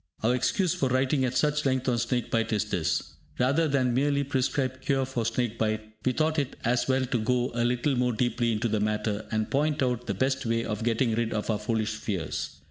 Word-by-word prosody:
Our 115 Hz, +3 st, +3 dB
excuse 170 Hz, -, +1 dB
for 135 Hz, -, 0 dB
writing 130 Hz, +1 st, +2 dB
at 125 Hz, 0 st, -1 dB
such 150 Hz, 0 st, +2 dB
length 130 Hz, -1 st, 0 dB
on 120 Hz, -2 st, +2 dB
snake 120 Hz, 0 st, -1 dB
bite 115 Hz, 0 st, +1 dB
is 105 Hz, -2 st, +1 dB
this. -, -, -2 dB, 0.2 s
Rather 140 Hz, +6 st, +2 dB
than 130 Hz, -4 st, +1 dB
merely 140 Hz, +2 st, +2 dB
prescribe 130 Hz, -1 st, -1 dB
cure 135 Hz, -1 st, +1 dB
for 120 Hz, -4 st, -2 dB
snake 115 Hz, -1 st, -1 dB
bite, 110 Hz, 0 st, -1 dB
we 130 Hz, -, +2 dB
thought 155 Hz, +3 st, +1 dB
it 140 Hz, -3 st, -2 dB
as 120 Hz, +1 st, +2 dB
well 130 Hz, 0 st, +2 dB
to 125 Hz, -1 st, -1 dB
go 125 Hz, +3 st, +1 dB
a 120 Hz, 0 st, 0 dB
little 125 Hz, +3 st, +1 dB
more 125 Hz, 0 st, +1 dB
deeply 120 Hz, +1 st, 0 dB
into 110 Hz, +1 st, 0 dB
the 110 Hz, -1 st, 0 dB
matter, 105 Hz, 0 st, -1 dB
and 110 Hz, -1 st, -1 dB
point 150 Hz, 0 st, +1 dB
out 125 Hz, -1 st, -1 dB
the 100 Hz, -, -1 dB
best 130 Hz, +6 st, 0 dB
way 115 Hz, -1 st, 0 dB
of 105 Hz, 0 st, -3 dB
getting 115 Hz, 0 st, +1 dB
rid 115 Hz, 0 st, 0 dB
of 110 Hz, +1 st, -1 dB
our 105 Hz, -, -1 dB
foolish 110 Hz, 0 st, -1 dB
fears. 100 Hz, -6 st, -3 dB
125 Hz, 220 wpm, -27 LUFS, 110-130 Hz, 0.2 s, Our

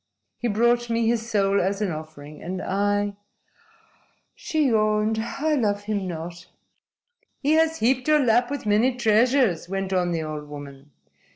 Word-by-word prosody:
He 240 Hz, -, -1 dB
brought 235 Hz, +2 st, +2 dB
me 230 Hz, 0 st, +1 dB
his 230 Hz, 0 st, 0 dB
soul 200 Hz, -2 st, +2 dB
as 195 Hz, +2 st, -1 dB
an 205 Hz, -4 st, -1 dB
offering. 155 Hz, -1 st, -9 dB
And 185 Hz, +2 st, -5 dB
I" 205 Hz, +1 st, -1 dB, 1.2 s
she 315 Hz, -11 st, -1 dB
yawned 215 Hz, 0 st, +1 dB
"I 295 Hz, +7 st, -2 dB
love 205 Hz, -7 st, 0 dB
him 205 Hz, -2 st, -2 dB
not." 170 Hz, 0 st, -7 dB, 0.9 s
"He 290 Hz, -, 0 dB
has 320 Hz, 0 st, +3 dB
heaped 250 Hz, +3 st, +1 dB
your 305 Hz, 0 st, +5 dB
lap 245 Hz, -2 st, +3 dB
with 285 Hz, -4 st, -5 dB
many 220 Hz, +5 st, +2 dB
treasures," 235 Hz, -, +2 dB
went 195 Hz, 0 st, -3 dB
on 180 Hz, -1 st, +1 dB
the 165 Hz, -2 st, -1 dB
old 150 Hz, -1 st, -6 dB
woman. 145 Hz, -1 st, -10 dB
210 Hz, 155 wpm, -24 LUFS, 180-240 Hz, 1.2 s, your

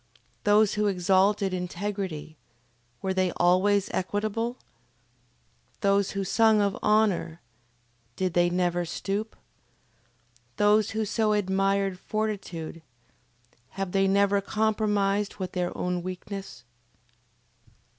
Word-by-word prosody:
Those 210 Hz, 0 st, +4 dB
who 210 Hz, 0 st, +1 dB
exalted 195 Hz, +1 st, +2 dB
integrity, 180 Hz, -3 st, -4 dB, 0.7 s
were 190 Hz, 0 st, 0 dB
they 185 Hz, -1 st, +1 dB
always 190 Hz, +3 st, +3 dB
equitable? 215 Hz, +5 st, -2 dB, 1.2 s
Those 200 Hz, -1 st, +2 dB
who 195 Hz, -, 0 dB
sung 220 Hz, +2 st, +4 dB
of 200 Hz, -1 st, +1 dB
honor, 210 Hz, -6 st, +1 dB, 0.8 s
did 185 Hz, +2 st, -1 dB
they 175 Hz, 0 st, +3 dB
never 175 Hz, 0 st, 0 dB
stoop? 200 Hz, +5 st, -4 dB, 1.2 s
Those 210 Hz, 0 st, +4 dB
who 220 Hz, -, +1 dB
so 215 Hz, +1 st, +1 dB
admired 195 Hz, -1 st, 0 dB
fortitude, 195 Hz, -7 st, -4 dB, 1.0 s
have 195 Hz, -2 st, -2 dB
they 195 Hz, 0 st, +2 dB
never 200 Hz, +1 st, +3 dB
compromised 210 Hz, -1 st, 0 dB
with 185 Hz, -3 st, -5 dB
their 180 Hz, -1 st, -3 dB
own 180 Hz, 0 st, -1 dB
weakness? 185 Hz, -2 st, -7 dB
195 Hz, 100 wpm, -27 LUFS, 185-210 Hz, 1.2 s, Those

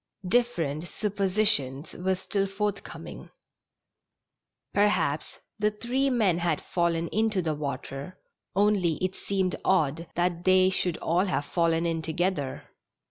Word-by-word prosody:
Different 175 Hz, -9 st, +1 dB
suppositions 195 Hz, -9 st, 0 dB
were 190 Hz, +1 st, 0 dB
still 195 Hz, +1 st, -1 dB
forthcoming. 200 Hz, 0 st, -5 dB, 1.4 s
Per 205 Hz, +1 st, +5 dB
haps 150 Hz, -7 st, -1 dB, 0.2 s
the 210 Hz, 0 st, +3 dB
three 245 Hz, +6 st, 0 dB
men 210 Hz, -9 st, +2 dB
had 170 Hz, -3 st, +1 dB
fallen 170 Hz, -1 st, 0 dB
into 215 Hz, -2 st, +1 dB
the 160 Hz, -1 st, 0 dB
water, 140 Hz, +2 st, -5 dB, 0.4 s
only 200 Hz, -4 st, +3 dB
it 185 Hz, +3 st, -2 dB
seemed 190 Hz, -2 st, -1 dB
odd 165 Hz, -3 st, +1 dB
that 175 Hz, 0 st, 0 dB
they 185 Hz, 0 st, +5 dB
should 180 Hz, -2 st, 0 dB
all 175 Hz, +4 st, +1 dB
have 170 Hz, -6 st, -1 dB
fallen 165 Hz, 0 st, +1 dB
in 165 Hz, -1 st, 0 dB
together. 160 Hz, -3 st, -2 dB
180 Hz, 125 wpm, -27 LUFS, 165-200 Hz, 1.4 s, Per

